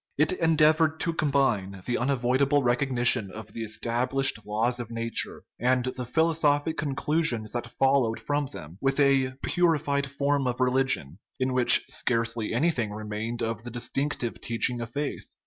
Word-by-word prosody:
It 155 +5 +3
endeavored 160 -2 +3
to 170 - 0
combine 120 - 0
the 120 - -1
unavoidable 135 +2 +1
recognition 120 -3 +2
of 110 +1 -10
the 115 - -6
established 120 +4 0
laws 115 +4 0
of 120 -2 -6
nature, 115 -1 -3 0.2
and 125 +1 +1
the 125 -2 -5
philosophic 160 0 +1
conclusions 140 -6 -1
that 120 - -3
followed 135 -4 +1
from 145 -1 -1
them, 85 - -10
with 135 +1 0
a 135 -2 +3
purified 150 -5 +1
form 140 0 0
of 125 0 -2
religion, 125 - 0 0.2
in 130 0 0
which 125 -1 +6
scarcely 115 -2 -1
anything 125 -3 0
remained 110 +2 -4
of 115 -1 -3
the 120 - -8
distinctive 125 +1 -2
teaching 120 +1 -1
of 115 - -5
faith. 145 +4 -5
130 Hz, 145 wpm, -26 LUFS, 115-145 Hz, 0.2 s, which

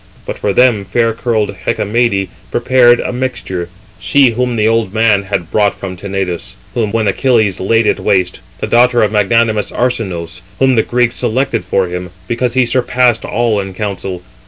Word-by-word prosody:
But - - -6
for 100 - 0
them 120 -2 +3
fair 115 +3 0
curled 110 -2 -1
Hecamede 105 -2 0 0.2
prepared 120 -1 +4
a - - -3
mixture, 120 -9 -4 0.3
she 125 +8 +3
whom 125 +1 -1
the 110 -1 +2
old 115 -3 0
man 110 -3 +3
had 95 -4 -3
brought 105 -2 +2
from 95 -2 -6
Tenedos, 95 -2 -4 0.2
when 110 -1 0
Achilles 110 -2 +1
laid 115 +4 +2
it - - +1
waste, 95 -3 0 0.2
the - - 0
daughter 120 0 +3
of 105 - +1
magnanimous 110 0 +1
Arsinoüs, 95 -10 -3 0.2
whom 135 -1 +3
the 115 - +4
Greeks 120 +1 0
selected 120 -2 -1
for 95 +1 0
him, 90 0 -5 0.2
because 120 +1 -1
he 130 -1 +4
surpassed 125 -1 +1
all 115 -3 0
in 95 -1 -5
counsel. 95 -3 -4
110 Hz, 165 wpm, -14 LUFS, 95-120 Hz, 0.3 s, prepared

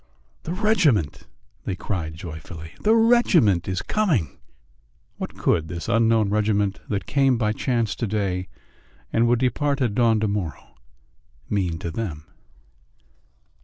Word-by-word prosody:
"The 165 - -4
regiment!" 180 - +1 0.4
they 95 - -2
cried 85 -5 -4
joyfully. 80 0 -9
"The 220 +2 +4
regiment 210 - +4
is 95 -1 -2
coming!" 165 - 0 0.8
What - - -6
could 80 -2 +1
this 85 +1 -6
unknown 115 -2 +3
regiment 105 -2 +1
that 100 -2 -2
came 135 -3 +2
by 105 -2 +1
chance 115 -3 0
to 115 - -2
day 95 -3 -1 0.7
and 115 +1 +3
would 120 +1 +3
depart 135 +3 0
at 120 -6 0
dawn 115 -1 +3
to 110 - +1
morrow 95 -8 -4 0.8
mean 90 -5 0
to 85 0 -5
them? 80 -7 -5
105 Hz, 130 wpm, -23 LUFS, 90-125 Hz, 0.8 s, The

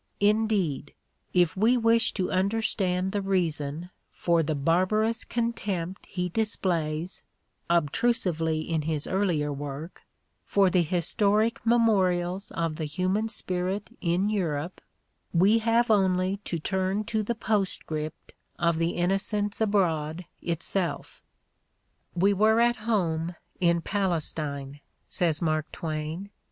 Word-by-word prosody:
Indeed, 205 -9 +1 0.4
if 175 -3 +3
we 225 +6 +3
wish 230 -1 +3
to 185 -3 -2
understand 190 -2 0
the 205 - -1
reason 170 -3 -1 0.2
for 170 -1 +1
the 155 0 -1
barbarous 185 +10 +1
contempt 200 -6 -3
he 180 -2 -2
displays, 175 -5 -1 0.5
obtrusively 165 -1 +1
in 160 0 -1
his 150 -1 -1
earlier 170 -7 0
work, 145 +4 -7 0.4
for 195 -2 +3
the 180 -1 +4
historic 200 +7 +1
memorials 195 -5 +2
of 165 -2 -2
the 160 - -2
human 185 +8 0
spirit 185 0 -1
in 180 +3 +1
Europe, 175 -5 -2 0.5
we 200 +7 +5
have 230 +1 +2
only 190 -1 +2
to 170 - -2
turn 190 +4 -1
to 220 0 -1
the 235 +3 -2
postscript 185 -8 -2 0.2
of 170 -1 +1
"The 165 +1 0
Innocents 200 +4 0
Abroad" 175 -6 +1 0.2
itself. 170 0 -2 0.9
""We 195 +3 +3
were 215 +3 +4
at 240 0 +3
home 170 -6 0 0.2
in 170 -1 +3
Palestine, 155 -7 -2
' - - -46
' - - -46
says 165 -2 +1
Mark 155 -1 0
Twain. 160 +5 -4
185 Hz, 120 wpm, -27 LUFS, 165-205 Hz, 0.9 s, we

